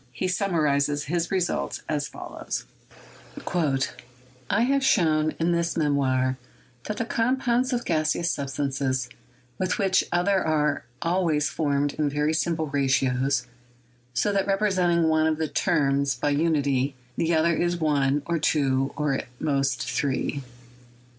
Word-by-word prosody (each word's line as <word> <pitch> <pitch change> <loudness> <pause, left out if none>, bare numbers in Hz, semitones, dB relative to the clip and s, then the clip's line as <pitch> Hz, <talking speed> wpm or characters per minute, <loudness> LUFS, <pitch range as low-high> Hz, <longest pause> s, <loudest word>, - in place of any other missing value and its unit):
He 155 +9 -2
summarized 160 -7 +1 0.2
his 170 +2 -1
results 185 -2 -1
as 150 -2 -1
follows: - - -6 1.8
"I 205 - +2
have 275 +2 +2
shown 155 -9 +2
in 165 +1 +2
this 170 0 0
memoir 130 -4 +1 0.5
that 210 - -4
the 230 - -1
compounds 250 +2 +1
of 240 -1 -1
gaseous 160 +2 +1
substances 135 -2 -2 0.5
with 185 -1 -1
each 190 -2 +3
other 185 +2 +2
are 150 -4 0 0.2
always 165 -4 +1
formed 145 -2 0
in 150 -2 0
very 150 +2 0
simple 160 0 0
ratios, 135 -2 +1 0.7
so 205 +11 +1
that 195 0 +1
representing 185 -4 +2
one 160 0 +3
of 155 -1 +1
the 160 0 -1
terms 140 -3 +1
by 145 +4 0
unity, 145 -3 +1 0.2
the 165 0 +1
other 165 +2 +3
is 175 +1 0
one, 145 -3 +1
or 170 -1 -1
two, 135 -3 +1
or 150 -2 +1
at 135 - -3
most 135 -4 0
three. 140 0 -1
155 Hz, 135 wpm, -25 LUFS, 140-175 Hz, 1.8 s, each